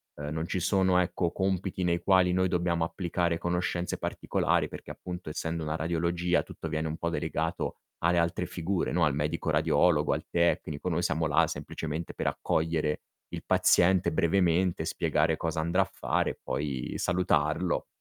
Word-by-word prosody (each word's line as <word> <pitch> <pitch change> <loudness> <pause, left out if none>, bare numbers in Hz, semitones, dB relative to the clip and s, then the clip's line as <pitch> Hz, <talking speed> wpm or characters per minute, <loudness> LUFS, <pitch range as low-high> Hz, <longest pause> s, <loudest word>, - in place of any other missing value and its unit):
Ehm, 75 0 -5
non 80 +1 -3
ci 90 - -2
sono, 95 0 +3
ecco, 85 -1 0
compiti 95 -1 -1
nei 85 -1 +1
quali 95 -1 +4
noi 95 +1 +2
dobbiamo 85 -2 +1
applicare 85 -1 -1
conoscenze 90 0 -1
particolari - - 0
perché - - -9
appunto 90 -2 -7
essendo 80 +1 -3
una 75 0 -2
radiologia, 85 +2 0
tutto 85 - -7
viene 80 0 -1
un 80 - -3
po' 85 - -2
delegato - - -2 0.2
alle 85 +1 +2
altre 85 +1 0
figure, 90 +2 -2
no, 85 0 +2
al 75 -3 +3
medico 75 +2 -1
radiologo, 80 -4 +3
al - - -4
tecnico, 85 -2 0
noi 85 -1 0
siamo 80 -2 0
là 80 +3 +4
semplicemente 80 +2 -5
per - - -3
accogliere 80 -2 0 0.3
il - - -5
paziente 90 -1 +4
brevemente, 90 +1 +2
spiegare 80 +1 +1
cosa 80 0 -2
andrà 85 +4 +2
a 95 - -2
fare - - 0
e - - -13
poi 70 -4 -3
salutarlo. 85 -2 +1
85 Hz, 165 wpm, -29 LUFS, 80-90 Hz, 0.3 s, quali